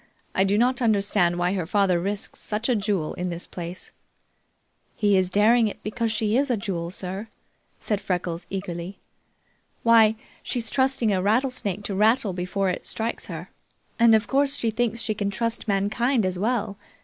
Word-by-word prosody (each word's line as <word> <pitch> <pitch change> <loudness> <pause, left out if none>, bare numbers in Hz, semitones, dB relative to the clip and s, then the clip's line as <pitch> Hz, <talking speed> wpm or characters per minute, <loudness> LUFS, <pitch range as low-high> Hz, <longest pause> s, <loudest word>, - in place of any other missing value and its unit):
I 190 - +3
do 200 +1 +2
not 250 +2 +2
understand 200 -6 +2
why 175 +1 +1
her 180 -5 -2
father 190 -2 +2
risks 200 +3 -4
such 215 +2 -3
a 250 - +2
jewel 200 -7 -1
in 180 0 -3
this 170 0 -5
place." 175 0 -8 1.0
"He's 195 -3 +3
daring 220 +4 +4
it 210 - -5
because 225 +1 -1
she 215 0 0
is 280 +2 +2
a 245 - +1
jewel, 175 -4 -3
sir," 190 +3 -5 0.5
said 210 -2 -2
Freckles, 175 -2 -3
eagerly. 185 -1 -5 0.9
"Why, 225 -2 +6 0.3
she's 230 -2 -3
trusting 260 -5 +2
a 185 - +1
rattlesnake 210 -2 0
to 205 - -3
rattle 215 0 +3
before 185 +2 -1
it - - -5
strikes 225 +1 -3
her, - - -7 0.5
and 230 -1 +7
of 220 0 +2
course, 280 +1 +2
she 230 -4 -1
thinks 230 0 -1
she 215 - -1
can 205 -1 -2
trust 230 +3 -2
mankind 215 +4 +1
as 185 -1 -2
well. 210 -2 -1
205 Hz, 170 wpm, -25 LUFS, 185-230 Hz, 1.0 s, and